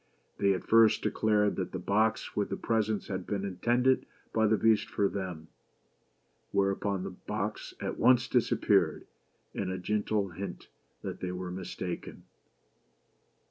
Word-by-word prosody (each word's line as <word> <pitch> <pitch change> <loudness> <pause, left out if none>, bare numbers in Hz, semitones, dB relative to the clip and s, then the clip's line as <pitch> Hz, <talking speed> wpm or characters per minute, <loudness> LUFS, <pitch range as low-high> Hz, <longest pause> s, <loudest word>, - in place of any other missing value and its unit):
They 100 -1 +4
at 90 - -5
first 115 -1 +5
declared 105 -1 +2
that 95 - -3
the - - -2
box 105 +4 0
with 105 - 0
the - - -3
presents 110 -2 0
had 95 -3 -4
been 100 -1 -2
intended 120 +7 +2 0.3
by 110 -1 +3
the 110 +1 +3
Beast 110 -1 +3
for 100 - +1
them; 90 -5 -5 1.0
whereupon 100 -1 0
the 95 - -4
box 105 +3 -4
at - - -4
once 125 -1 +5
disappeared, - - +2 0.5
as - - -3
a 95 - -2
gentle 105 +1 0
hint 90 +1 -7 0.3
that - - -5
they 90 - -3
were 90 0 -5
mistaken. 90 -1 -6
100 Hz, 140 wpm, -30 LUFS, 95-110 Hz, 1.0 s, first